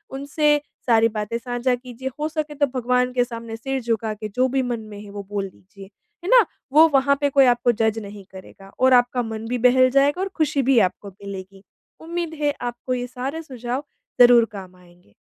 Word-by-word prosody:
उनसे 295 +1 +1 0.3
सारी 225 -1 +5
बातें 215 +1 -3
साझा 245 +1 -1
कीजिए, 250 +1 -7
हो 305 - 0
सके 305 -1 -4
तो 290 0 +2
भगवान 250 +1 +1
के 245 -1 +2
सामने 230 -2 -7
सिर 270 +3 -3
झुका 225 -2 -1
के 215 0 -6
जो 250 +5 +1
भी 265 +1 0
मन 240 -2 -2
में 210 -1 -10
है, 205 - -11
वो 200 0 -7
बोल 200 -2 -3
दीजिए, 195 +1 -15 0.4
है 365 - -4
ना। - - +7 0.3
वो 320 +2 +8
वहाँ 280 +1 +4
पे 285 - +2
कोई 275 -1 +5
आपको 245 -1 +3
जज 220 0 0
नहीं 205 -1 -10
करेगा 195 +1 -13
और 260 0 +5
आपका 245 0 +3
मन 220 0 -6
भी 250 - -1
बहल 255 +1 +4
जाएगा 285 +6 +3
और 390 - -2
खुशी 295 -3 +1
भी 260 -1 +4
आपको 200 +2 -13
मिलेगी। 195 0 -10 0.4
उम्मीद 335 0 -4
है, 290 -1 +1
आपको 245 +1 -4
ये 245 0 -3
सारे 260 +5 -5
सुझाव 255 -1 -5 0.4
ज़रूर 240 -1 +7
काम 190 -2 -9
आएँगे। 175 - -23
245 Hz, 205 wpm, -22 LUFS, 215-270 Hz, 0.4 s, वो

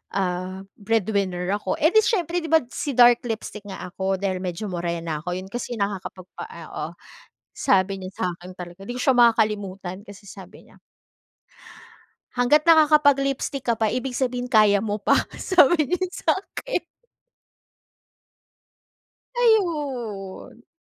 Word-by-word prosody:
ah, 185 0 -2 0.2
breadwinner 200 -4 -1
ako. 300 +9 -3
Eh, 315 +3 +4
'di 435 - +8
siyempre, 355 -6 0
'di 320 - -5
ba, 320 - +7
si 290 - -3
dark 240 0 +6
lipstick 220 -2 -5
nga 190 -2 -7
ako, 190 +2 -1
dahil 190 -2 -1
medyo 180 +4 -4
morena 170 -3 -3
ako, 180 - -4
'yon 185 +1 -7
kasi 240 0 -4
nakakapagpa 190 -2 -5
ah, - - -11
oo. - - -4 0.7
Sabi 195 -4 +1
niya 185 0 -7
sa'kin 180 +1 -5
talaga, 180 +2 -10
'di 245 - -5
ko - - -2
siya 265 - +4
makakalimutan, 205 -5 +1
kasi 200 +1 -13
sabi 190 0 -13
niya - - -21 1.6
"Hanggat 250 +5 +4
nakakapag-lipstick 285 -4 +3
ka 235 - +3
pa, 220 -1 0
ibig 250 +1 -3
sabihin 250 -1 -1
kaya 215 -4 +5
mo 210 0 -3
pa", - - +4 0.2
sabi 320 -5 +3
niya 370 +1 0
sa'kin. 450 +6 -2 2.6
Ayun, 270 - -1
215 Hz, 135 wpm, -23 LUFS, 190-275 Hz, 2.6 s, di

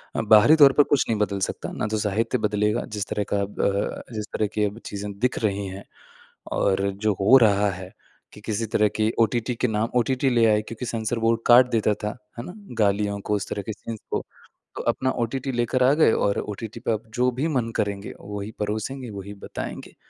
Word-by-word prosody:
अ, - - +1
बाहरी 110 +8 +6
तौर 140 -3 +7
पर 145 - +6
कुछ 145 -2 +2
नहीं 110 - +1
बदल 100 -1 0
सकता। 95 - -3
ना - - -3
तो 110 0 -1
साहित्य 110 +4 0
बदलेगा 105 +2 +1
जिस 105 0 -2
तरह 105 - -1
का 100 - +2
अब 100 +1 -4
अ, 100 +4 -2
जिस 105 -1 -4
तरह 105 - 0
की 105 - 0
अब 105 +3 -4
चीज़ें 100 0 -5
दिख 125 +1 0
रही 100 -1 0
हैं 95 +1 -8 0.7
और 100 0 +1 0.2
जो 105 - +4
हो 115 +7 +7
रहा 100 -1 +3
है 95 +1 -8 0.4
कि 105 - -13
किसी 110 +1 -1
तरह 105 0 +4
की 110 +1 +1
ओटीटी 115 +2 +1
के 125 - 0
नाम 110 +1 -1
ओटीटी 130 +2 +1
ले 120 -2 +3
आए 105 -1 +4
क्योंकि 115 +3 -7
सेंसर 115 0 -2
बोर्ड 115 0 +2
काट 125 +1 +8
देता 110 -2 +2
था, 105 - 0 0.3
है - - -4
ना? 180 - -8 0.3
गालियों 100 0 +1
को, 105 - -1
उस 100 - -4
तरह 100 - -3
के 110 - -5
सीन्स 115 0 -7
को - - 0 0.5
तो - - -4
अपना 130 - -2
ओटीटी 135 +3 -3
लेकर 120 +1 +1
आ 135 +3 +5
गए 150 -7 +4
और 100 - +1
ओटीटी 105 +1 -6
पे - - -1
आप 110 +1 -3
जो 125 +1 +3
भी 155 - +1
मन 115 -2 0
करेंगे 100 0 -2
वही 105 +1 -6
परोसेंगे, 110 +5 -3
वही 100 0 -7
बताएँगे। 100 - -7
110 Hz, 220 wpm, -24 LUFS, 100-120 Hz, 0.7 s, काट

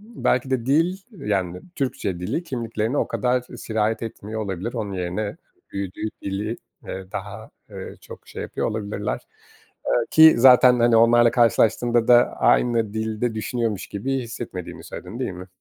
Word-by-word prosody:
belki 130 -7 +1
de 130 -3 -1
dil, 165 +7 +2
yani, 95 - -2
Türkçe 100 - -2
dili 110 - -2
kimliklerine 115 -3 -2
o - - +1
kadar 125 +3 0
sirayet 110 -2 -2
etmiyor 110 -1 -6
olabilir. 100 +2 -4
Onun 105 -5 -3
yerine 95 +3 -3 0.3
büyüdüğü 100 +2 -4
dili, 105 +4 -3 0.3
ııı, 95 0 -7
daha, 105 +2 -7 0.2
ııı, - - -8
çok - - -13
şey - - -7
yapıyor - - -2
olabilirler, 105 -1 -4 0.6
ııı, 120 - +2
ki 160 0 +9
zaten, 125 0 +7
hani, 120 0 +4
onlarla 120 +1 +5
karşılaştığında 120 0 +3
da 120 0 +5
aynı 115 -4 +2
dilde 110 +1 -2
düşünüyormuş 110 -2 -2
gibi 135 +7 -2
hissetmediğini 115 -6 -7
söyledin 100 +7 -8
değil 130 - -2
mi? 90 0 -9
115 Hz, 145 wpm, -23 LUFS, 100-120 Hz, 0.6 s, ki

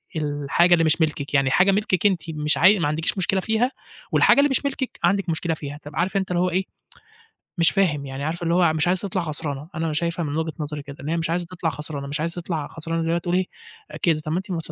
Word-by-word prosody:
الحاجة 150 +3 +2
اللي 165 - +4
مش 160 +1 +2
ملكِك 150 -3 -1
يعني 135 -2 +3
حاجة 180 +7 +5
ملكِك 195 -2 0
أنتِ 190 -4 +4
مش 150 -1 0
عاي 195 +3 +6
ما 150 - +1
عندكيش 160 +5 -1
مشكلة 190 +1 +1
فيها، 220 +5 +1 0.4
والحاجة - - +5
اللي 285 0 +5
مش 270 - 0
ملكِك 270 -2 -3
عندِك 195 +2 +2
مشكلة 165 +1 0
فيها، 145 -1 -7
طَب 145 - -9
عارف 190 +3 0
أنت 190 -1 -2
اللي 175 - +1
هو 180 - +2
إيه 185 +2 0 0.9
مش 165 - +5
فاهم 155 -8 +1
يعني 135 +1 -6
عارف 165 +3 -3
اللي 170 0 +1
هو 175 -3 +4
مش 155 +2 +1
عايزة 185 +2 +1
تطلع 185 -1 -1
خسرانة، 150 -1 -4
أنا 165 -1 -1
شايفها 170 +2 -1
من 145 +1 -3
وجهِة 160 -1 -2
نظري 150 -1 -4
كده 140 0 -10
إن 145 - -5
هي 165 - 0
مش 165 -1 -2
عايزة 175 +1 -1
تِطلَع 175 -1 -3
خسرانة، 150 -2 -5
مش 145 +2 -3
عايزة 170 +2 -2
تِطلَع 165 -4 -3
خسرانة 165 +1 -3
زي 165 - -2
ما 170 - +2
تقول 175 +1 -1
إيه، 185 0 +2 0.6
كده 165 -3 +2
طَب 155 - -5
ما 165 - +1
أنتِ 180 -5 -4
165 Hz, 250 wpm, -23 LUFS, 150-180 Hz, 0.9 s, عاي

